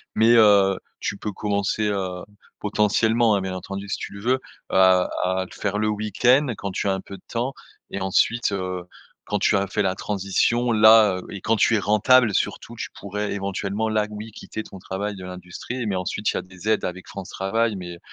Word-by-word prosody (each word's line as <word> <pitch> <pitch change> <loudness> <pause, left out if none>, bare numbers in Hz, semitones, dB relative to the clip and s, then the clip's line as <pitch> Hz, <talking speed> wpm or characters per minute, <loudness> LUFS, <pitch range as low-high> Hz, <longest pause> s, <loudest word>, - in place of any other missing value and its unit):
Mais 115 +2 +5
heu, 100 -4 +6 0.2
tu 100 - -2
peux 105 +1 -4
commencer, 100 +1 -1
heu, 95 -3 -3 0.4
potentiellement, 110 +2 +2
hein, 100 - 0
bien 95 0 -4
entendu 100 +2 -6
si - - -1
tu - - -7
le 100 - -9
veux, 120 +4 +2
heu, - - -6 0.3
à 95 -1 +4 0.2
à 95 0 0
le - - -17
faire 105 0 -1
le 105 0 +1
week-end 110 +7 +2
quand 100 - -4
tu 95 - -2
as 95 - +2
un 95 - -3
peu 100 - -10
de - - -22
temps 120 +3 -2 0.4
et 95 - -4
ensuite 100 +4 +1
heu, 90 -2 -3 0.4
quand 105 - -1
tu 105 - +3
as 100 0 +2
fait 105 - -1
la 95 -1 0
transition 105 +5 0
là, 110 -2 +7
heu 90 - -7
et 100 - -7
quand 115 - +2
tu 115 +1 +3
es - - +2
rentable 110 +3 +4
surtout, - - -2
tu - - -5
pourrais 105 +1 -3
éventuellement 100 +2 -2
là 110 -1 +1
oui 105 +1 -8
quitter 110 +1 -7
ton 95 - -11
travail 100 +3 -4
de 95 - -9
l'industrie 90 +7 -6
mais 100 -3 -1
ensuite 90 +3 -2
il - - -7
y - - +1
a - - -1
des 95 +2 -7
aides 110 - +2
avec 90 +1 -6
France 95 -1 -8
Travail 110 +3 0
mais 85 -2 -8
100 Hz, 220 wpm, -23 LUFS, 95-110 Hz, 0.4 s, là